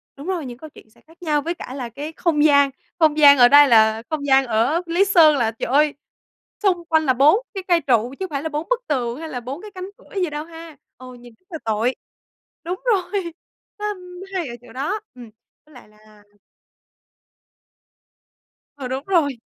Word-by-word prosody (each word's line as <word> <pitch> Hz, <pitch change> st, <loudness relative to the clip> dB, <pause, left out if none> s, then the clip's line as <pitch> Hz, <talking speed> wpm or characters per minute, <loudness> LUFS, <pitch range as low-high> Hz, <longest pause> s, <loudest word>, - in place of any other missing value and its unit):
đúng 285 Hz, +5 st, -10 dB
rồi, 350 Hz, -6 st, -3 dB
những 240 Hz, -1 st, -8 dB
câu 315 Hz, +3 st, -11 dB
chuyện 220 Hz, -, -18 dB
sẽ 225 Hz, -, -26 dB
khác 325 Hz, +2 st, -23 dB
nhau 300 Hz, -3 st, 0 dB
với 335 Hz, +4 st, -3 dB
cả 260 Hz, -6 st, -9 dB
là 250 Hz, -4 st, -6 dB
cái 290 Hz, +7 st, -7 dB
không 310 Hz, -4 st, 0 dB
gian, 285 Hz, -2 st, +5 dB, 0.3 s
không 310 Hz, -2 st, +3 dB
gian 285 Hz, -2 st, +8 dB
ở 245 Hz, -1 st, +7 dB
đây 285 Hz, +2 st, +7 dB
là 220 Hz, -1 st, +4 dB
không 305 Hz, -2 st, -3 dB
gian 270 Hz, -1 st, +4 dB
ở 240 Hz, +10 st, +1 dB
Lý 345 Hz, +4 st, +2 dB
Sơn 330 Hz, -6 st, +5 dB
là, 225 Hz, -3 st, 0 dB
trời 225 Hz, -, -5 dB
ơi, 295 Hz, +1 st, +3 dB, 0.7 s
xung 355 Hz, -4 st, +1 dB
quanh 315 Hz, -1 st, +2 dB
là 260 Hz, -, +3 dB
4 295 Hz, -, +4 dB
cái 385 Hz, -2 st, -5 dB
cây 345 Hz, -2 st, +3 dB
trụ 245 Hz, -2 st, +1 dB
chứ 380 Hz, -, -3 dB
phải 280 Hz, 0 st, -4 dB
là 320 Hz, -, -3 dB
bốn 300 Hz, +6 st, -5 dB
bức -, -, 0 dB
tường 250 Hz, -1 st, -2 dB
hay 320 Hz, -1 st, -7 dB
là 250 Hz, -4 st, -5 dB
bốn 265 Hz, +7 st, -7 dB
cái 425 Hz, -1 st, -11 dB
cánh 370 Hz, +1 st, -7 dB
cửa -, -, -18 dB
gì 355 Hz, -, 0 dB
đâu 300 Hz, +1 st, -6 dB
ha. 330 Hz, -3 st, -12 dB, 0.2 s
Ừ, 255 Hz, 0 st, -12 dB
nhìn 240 Hz, -1 st, -15 dB
rất 370 Hz, -, -44 dB
là 325 Hz, -, -6 dB
tội. 225 Hz, +3 st, 0 dB, 0.7 s
Đúng 360 Hz, +6 st, -5 dB
rồi. 380 Hz, -5 st, -1 dB, 0.5 s
Nó 420 Hz, -, -4 dB, 0.5 s
hay 350 Hz, -6 st, -2 dB
ở 240 Hz, -, -7 dB
chỗ 235 Hz, -2 st, -16 dB
đó. 310 Hz, +12 st, -3 dB, 0.2 s
Ừm. 240 Hz, -3 st, -12 dB, 0.4 s
Với 305 Hz, -, -22 dB
lại 245 Hz, -4 st, -16 dB
là 215 Hz, -1 st, -22 dB, 2.5 s
Ờ, 265 Hz, -3 st, -6 dB
đúng 265 Hz, +2 st, -4 dB
rồi. 310 Hz, -9 st, +1 dB
295 Hz, 210 wpm, -21 LUFS, 250-335 Hz, 2.5 s, gian